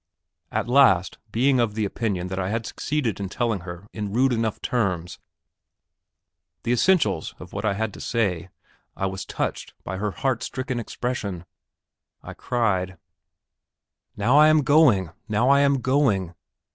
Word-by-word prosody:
At 110 0 -1
last, 100 -9 +4
being 130 +3 +3
of 115 -3 0
the 110 -1 0
opinion 100 -3 -2
that 95 +1 -3
I 95 0 -1
had 115 +1 -2
succeeded 135 -3 -2
in 100 -2 -4
telling 115 -1 -1
her 90 +2 -9
in 105 -2 -4
rude 125 +4 +2
enough 115 -2 -1
terms 90 -8 -2 1.4
the 120 - -1
essentials 125 - +2
of 90 - -12
what 100 +2 -3
I 100 -2 +1
had 110 0 -2
to - - -10
say, 95 -7 -1 0.5
I 95 - -1
was 95 0 -4
touched - - -4
by 95 - -5
her 105 +2 -1
heart 130 +4 -1
stricken 130 -2 -3
expression. 105 -7 -4 0.8
I - - -8
cried: 95 -6 -1 1.2
"Now 120 +8 +4
I 155 - +8
am 155 -1 +4
going, 125 - +4 0.2
now 110 +5 +2
I 140 0 +6
am 140 -2 +3
going. 115 - +1
110 Hz, 155 wpm, -24 LUFS, 95-125 Hz, 1.4 s, I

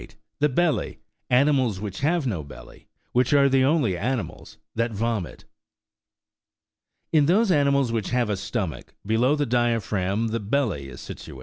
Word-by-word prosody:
THE 150 - +3
BELLY: 165 +4 0 0.3
ANIMALS 130 -5 +3
WHICH 100 -2 -6
HAVE 155 +2 +1
NO 100 -11 -2
BELLY. 70 - -14 0.2
WHICH 125 +3 +2
ABE 140 -1 +5
THE 135 -1 +4
ONLY 135 - +2
ANIMALS 120 +6 -4 0.2
THAT 115 0 -1
VOMIT. 110 -3 -3 1.7
In 150 -3 +4
those 200 +4 +3
animals 140 -5 +2
which 110 -4 -2
have 125 -3 0
a - - +1
stomach, 95 -3 -5
below 120 +7 +2
the 145 -1 0
diaphragm 115 -4 0
the 115 +1 -2
belly 105 - -1
is 60 - -10
situate. 65 - -9
120 Hz, 145 wpm, -24 LUFS, 105-140 Hz, 1.7 s, ABE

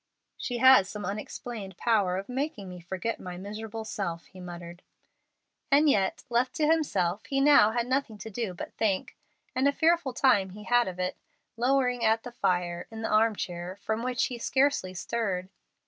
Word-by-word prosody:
"She 245 - -4
has 260 -6 +7
some 210 -2 -6
unexplained 205 0 -6
power 205 -6 +2
of 195 - -5
making 255 -5 -3
me 180 0 -8
forget 185 +6 -4
my 180 -1 -7
miserable 215 +3 -6
self," 170 -6 -4
he 185 - -15
muttered. 175 -1 -9 0.9
And 290 +2 +5
yet, 195 -9 +2
left 240 +2 0
to 305 - +1
himself, 210 - +1
he 275 - -4
had 275 - +3
now 250 -8 +7
nothing 255 -3 -1
to 220 +2 -8
do 205 -3 -3
but - - -7
think, 200 -4 -1 0.4
and 260 +2 +3
a - - +4
fearful 320 -2 +2
time 240 -8 +3
he 210 +3 -10
had 240 0 +3
of 185 -1 -6
it, 185 0 -2 0.4
lowering 250 0 +1
at 220 +1 +3
the 245 - -7
fire, 175 -5 -1
in 225 0 -7
the - - -1
arm 220 +1 +4
chair, 175 -1 -5
from 220 +3 -3
which 250 0 0
he 245 -2 -5
scarcely 260 -8 +1
stirred. 185 -3 -2
220 Hz, 180 wpm, -28 LUFS, 185-250 Hz, 0.9 s, has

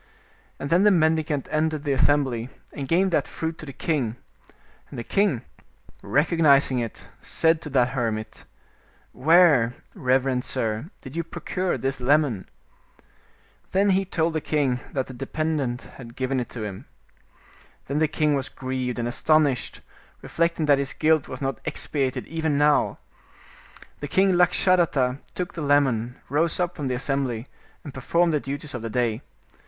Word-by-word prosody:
And 140 - -5
then 175 +2 +5
the 210 - +6
mendi 160 -4 +3
cant 145 -4 -3
entered 155 -1 0
the 145 - -1
assembly, 130 -4 +2 0.2
and 140 -2 -5
gave 185 +5 +2
that 150 -4 +1
fruit 160 0 -4
to 155 - -9
the - - -6
king, 135 -6 -1 0.7
and - - -9
the 120 - -4
king, 195 - +1 0.6
recognizing 145 -4 +3
it, 115 -2 -5 0.2
said 160 0 +1
to 150 - -7
that 130 -3 +3
hermit, 115 -4 -3 0.3
" - - -34 0.2
Where, 155 -9 +6 0.2
reverend 130 0 +1
sir, 110 +7 -2
did 130 +2 -10
you 170 - -1
procure 175 +2 -3
this 135 0 -2
lemon?" 130 -6 +1 1.2
Then 195 +1 +3
he 190 +1 +2
told 165 -3 -1
the 155 - -1
king 140 -5 0
that 130 -2 -1
the 130 - -10
dependent 135 -1 -2
had 120 -2 -12
given 130 0 -1
it 120 - -4
to 115 - -6
him. 100 -3 -6 1.0
Then 140 +2 -1
the 155 - +3
king 150 0 +1
was 135 -2 -1
grieved 130 -1 -3
and 120 0 -1
astonished, 145 +1 +1 0.4
reflecting 170 -1 0
that 145 -2 +4
his 140 0 -3
guilt 155 -2 +2
was 130 +2 -7
not 135 0 -2
expiated 135 -4 -2
even 160 -3 -1
now. 145 0 +3 1.0
The 145 - -4
king 190 +5 +3
Lakshadatta 175 -7 +3 0.2
took 180 -1 -3
the 165 - -5
lemon, 135 -5 +2
rose 160 +5 +1
up 180 0 -1
from 145 -4 -3
the 130 - -1
assembly, 130 -3 -1 0.4
and 145 - -8
performed 170 +5 +1
the 150 - +2
duties 145 +1 -6
of 120 - -4
the 115 - -4
day. 115 0 0
145 Hz, 160 wpm, -24 LUFS, 130-160 Hz, 1.2 s, the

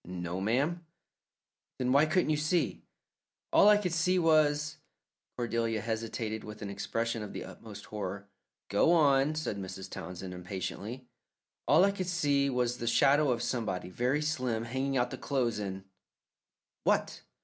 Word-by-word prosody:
"No, 90 0 -5
ma'am." 140 - 0 0.9
"Then 125 -1 0
why 140 +4 +5
couldn't 155 0 +2
you 150 - +2
see?" 155 +4 0 0.7
"All 205 - +7
I 210 - +7
could 180 -5 -2
see 180 +2 +2
was 155 -2 +3 0.3
" - - -60
Cordelia 115 -2 -1
hesitated, 110 0 -3
with 105 0 -8
an 100 - -4
expression 115 +2 -2
of 105 - -7
the - - -5
utmost - - -10
horror. 100 -1 -5 0.4
"Go 105 - +3
on," 145 -2 +4
said 155 -9 -2
Mrs. 95 0 -6
Townsend, 90 +1 -7
impatiently. 100 +7 -5 0.6
"All 160 +6 +6
I 200 - +3
could 185 -2 -4
see 145 -5 +2
was 125 -1 0
the 115 - -3
shadow 140 +5 +4
of 120 -1 0
somebody, 95 -8 -2
very 125 +9 0
slim, 130 -7 -1
hanging 130 +3 -1
out 120 0 +1
the - - -6
clothes, 120 -6 0
and 95 -2 -5 0.5
" - - -62
"What?" - - +1
125 Hz, 160 wpm, -31 LUFS, 105-150 Hz, 0.9 s, All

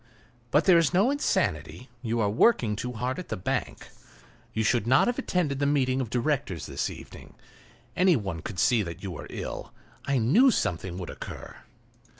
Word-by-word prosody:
But 150 +5 +3
there 180 -3 +7
is 165 +1 +1
no 205 +8 +4
insanity; 105 - -1
you 115 -1 -1
are 105 - +2
working 115 - +3
too 125 +4 -4
hard 125 +5 -3
at 180 - -8
the - - -3
bank. 90 - -3 0.6
You 110 - -1
should 115 0 +1
not 130 +3 +5
have 245 +2 -1
attended 165 - -1
the 140 - +1
meeting 135 -2 +1
of 120 - -4
directors 120 - -1
this - - -2
evening; - - -12 0.6
any 180 -1 +4
one 95 - -3
could 105 -1 -7
see 115 +6 +3
that 85 -2 -6
you 95 - -4
were - - -8
ill; - - -6 0.3
I 140 -1 +1
knew 175 - +5
something 90 - -1
would 90 -2 -6
occur." - - -9
125 Hz, 180 wpm, -27 LUFS, 105-165 Hz, 0.6 s, there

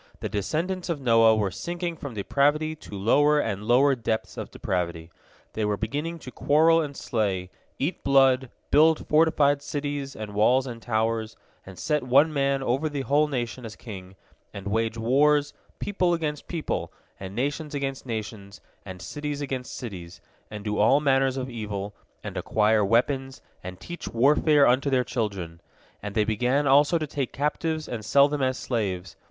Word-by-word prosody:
The - - -4
descendants 170 - -2
of 165 -4 -1
Noah 115 -3 +5
were 105 -3 0
sinking 175 - -4
from 140 -6 -8
depravity 145 +9 +1
to 105 -9 -10
lower 145 +9 +3
and 105 -6 -2
lower 130 +5 +4
depths 110 -3 -3
of - - -6
depravity. 85 -2 -3 0.4
They 110 - -2
were 105 -1 0
beginning 160 +8 -3
to 125 - -7
quarrel 160 +5 +4
and 145 -3 -5
slay, 95 -6 -2 0.3
eat 145 +7 -3
blood, 135 -2 +4 0.2
build 155 +2 +4
fortified 150 -2 +3
cities 145 -2 -4
and 105 -1 -7
walls 125 +6 +3
and 120 -3 -7
towers, 110 -1 -1 0.3
and 95 -1 -11
set 150 - 0
one 140 +5 +4
man 140 -1 +1
over 135 +5 0
the 145 -2 -3
whole 145 +3 +2
nation 125 -3 -4
as 110 -2 -8
king, 95 -5 -10 0.4
and 100 -1 -9
wage 115 +2 -1
wars, 145 +5 +3 0.2
people 185 -4 0
against 150 -3 -4
people, 165 -3 -3 0.3
and 95 0 -7
nations 145 +4 -2
against 135 -1 -3
nations, 105 -4 -6 0.2
and 95 -2 -9
cities 145 -1 -4
against 130 -3 -5
cities, 90 -6 -8 0.3
and 105 -1 -7
do 105 0 -2
all 120 +7 +5
manner 135 -2 +3
of 130 -1 -3
evil, 105 -4 -5 0.3
and - - -6
acquire 110 0 +2
weapons, 130 +5 +1 0.2
and 90 0 -8
teach 175 - -8
warfare 145 +4 +4
unto 130 +3 +3
their 130 -2 +2
children. 95 -10 -4 0.4
And 105 0 -6
they 110 - +3
began 125 +6 +1
also 145 +4 +5
to 155 - -2
take 140 -3 -3
captives 155 +2 -2
and 115 -3 -5
sell 140 +6 +5
them 145 -1 -3
as 130 0 +1
slaves. 95 -7 -3
130 Hz, 170 wpm, -26 LUFS, 110-145 Hz, 0.4 s, Noah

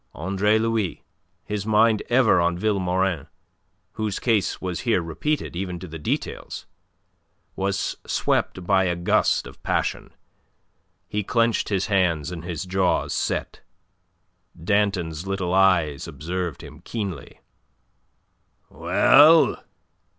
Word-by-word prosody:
Andre 100 +5 +1
Louis 110 -4 -1 0.4
his 105 -1 -3
mind 110 0 +3
ever 120 -7 +4
on 85 0 +1
Vilmorin, 95 -5 0 0.6
whose 110 -2 -3
case 110 -6 0
was 90 -2 -4
here 120 -6 +1
repeated, 85 - -3
even 90 -1 -4
to 95 - -9
the 80 0 -8
details - - -4 0.9
was 100 +1 -2
swept 90 - -1
by 95 0 +3
a 90 -1 0
gust 85 0 +1
of - - -13
passion. - - -2 1.0
He 105 0 -2
clenched 115 +2 +1
his 95 -3 0
hands, 90 -6 +1
and 85 -2 -7
his 85 0 -5
jaws 95 0 0
set. - - -3 1.0
Danton's 95 -3 0
little 95 -2 -2
eyes 90 -7 +2
observed 90 +1 -5
him - - -12
keenly. 100 - -6 1.3
"Well? 160 +3 +5
95 Hz, 115 wpm, -23 LUFS, 85-105 Hz, 1.3 s, Well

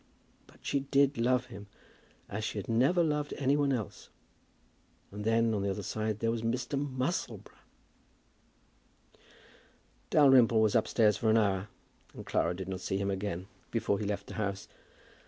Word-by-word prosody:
But - - -21
she 140 - +1
did 140 0 +2
love 125 +1 +2
him, 100 -1 -11 0.6
as 105 +2 -5
she 110 - -3
had 100 - -4
never 135 +10 +3
loved 150 -2 -1
any 140 0 +2
one 145 -1 +2
else; 115 -6 -4 1.0
and 105 +1 -6
then, 115 +1 +2
on 105 - -1
the 100 - -1
other 100 +1 -3
side, 110 +2 -2
there 115 0 +1
was 115 -1 -2
Mr. 120 +4 -2
Musselboro! 140 +3 -3 2.5
Dalrymple 135 -7 +6
was 110 -1 +3
upstairs 110 -2 +3
for 110 - 0
an 110 - +5
hour, 100 -2 +1 0.5
and - - -9
Clara 90 - 0
did 95 0 -6
not 95 -1 -5
see 95 - -2
him 100 0 -1
again 95 -2 -3 0.2
before 100 -4 0
he 105 - -3
left 100 -1 -3
the - - -9
house. 100 -1 -3
115 Hz, 160 wpm, -31 LUFS, 100-130 Hz, 2.5 s, Dalrymple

